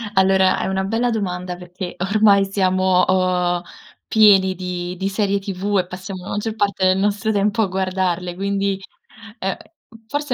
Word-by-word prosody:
Allora, 190 Hz, 0 st, +4 dB
è -, -, -2 dB
una 190 Hz, 0 st, -1 dB
bella 225 Hz, +5 st, 0 dB
domanda 180 Hz, -4 st, -3 dB
perché 180 Hz, +1 st, -8 dB
ormai 200 Hz, +1 st, +4 dB
siamo 185 Hz, -1 st, +2 dB
o 180 Hz, -1 st, +1 dB, 0.4 s
pieni 195 Hz, -4 st, +5 dB
di 180 Hz, 0 st, -5 dB
di 195 Hz, +1 st, -2 dB
serie 200 Hz, 0 st, 0 dB
TV 195 Hz, +1 st, -2 dB
e 180 Hz, -, -2 dB
passiamo 185 Hz, 0 st, -8 dB
la 190 Hz, -, -8 dB
maggior 215 Hz, +2 st, -3 dB
parte 200 Hz, -3 st, 0 dB
del 185 Hz, 0 st, +3 dB
nostro 205 Hz, +2 st, 0 dB
tempo 205 Hz, +1 st, +1 dB
a 210 Hz, -, +2 dB
guardarle, 185 Hz, -1 st, -2 dB
quindi, 200 Hz, 0 st, -1 dB, 0.6 s
uhm, 190 Hz, -1 st, -2 dB, 0.5 s
forse 290 Hz, +2 st, -2 dB
190 Hz, 155 wpm, -20 LUFS, 185-200 Hz, 0.6 s, pieni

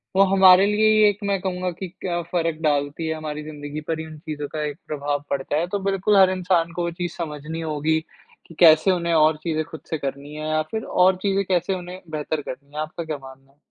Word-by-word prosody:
वो 195 Hz, -, +7 dB
हमारे 190 Hz, 0 st, +7 dB
लिए 215 Hz, 0 st, +4 dB
एक 205 Hz, -, -2 dB
मैं 200 Hz, -1 st, 0 dB
कहूँगा 185 Hz, -1 st, -2 dB
कि 185 Hz, +2 st, -6 dB
क्या 175 Hz, -2 st, -1 dB
फ़र्क 165 Hz, -2 st, 0 dB
डालती 145 Hz, +1 st, 0 dB
है 160 Hz, -, -1 dB
हमारी 150 Hz, -1 st, -5 dB
ज़िंदगी 150 Hz, 0 st, -7 dB
पर 160 Hz, -1 st, -1 dB
ये 160 Hz, -, -5 dB
उन 155 Hz, -1 st, -10 dB
चीज़ों 150 Hz, -2 st, -5 dB
का 155 Hz, -1 st, -2 dB
एक 145 Hz, -1 st, -4 dB
प्रभाव 145 Hz, -1 st, -2 dB
पड़ता 140 Hz, +1 st, -1 dB
है। 170 Hz, +3 st, 0 dB
तो 200 Hz, +2 st, -2 dB
बिल्कुल 195 Hz, +1 st, +1 dB
हर 190 Hz, -1 st, +7 dB
इंसान 180 Hz, -2 st, +1 dB
को 175 Hz, -, -2 dB
वो 170 Hz, -, -1 dB
चीज़ 175 Hz, +1 st, -4 dB
समझनी 160 Hz, 0 st, -5 dB
होगी 160 Hz, 0 st, 0 dB, 0.5 s
कि 165 Hz, -, -14 dB
कैसे 165 Hz, +2 st, +7 dB
उन्हें 170 Hz, -2 st, 0 dB
और 155 Hz, -1 st, +4 dB
चीज़ें 155 Hz, -2 st, -1 dB
ख़ुद 160 Hz, -, -8 dB
से 160 Hz, -, 0 dB
करनी 140 Hz, +1 st, -6 dB
है 155 Hz, 0 st, -4 dB
या 155 Hz, 0 st, +2 dB
फ़िर 220 Hz, 0 st, -3 dB
और 185 Hz, +1 st, +3 dB
चीज़ें 200 Hz, 0 st, +1 dB
कैसे 185 Hz, +1 st, +1 dB
उन्हें 180 Hz, +1 st, -8 dB
बेहतर 155 Hz, 0 st, -3 dB
करनी 140 Hz, +1 st, -9 dB
है। 150 Hz, -, -2 dB
आपका 155 Hz, +2 st, -5 dB
क्या 155 Hz, -2 st, -4 dB
मानना 135 Hz, 0 st, -14 dB
है? 140 Hz, -, -33 dB
160 Hz, 230 wpm, -23 LUFS, 150-185 Hz, 0.5 s, वो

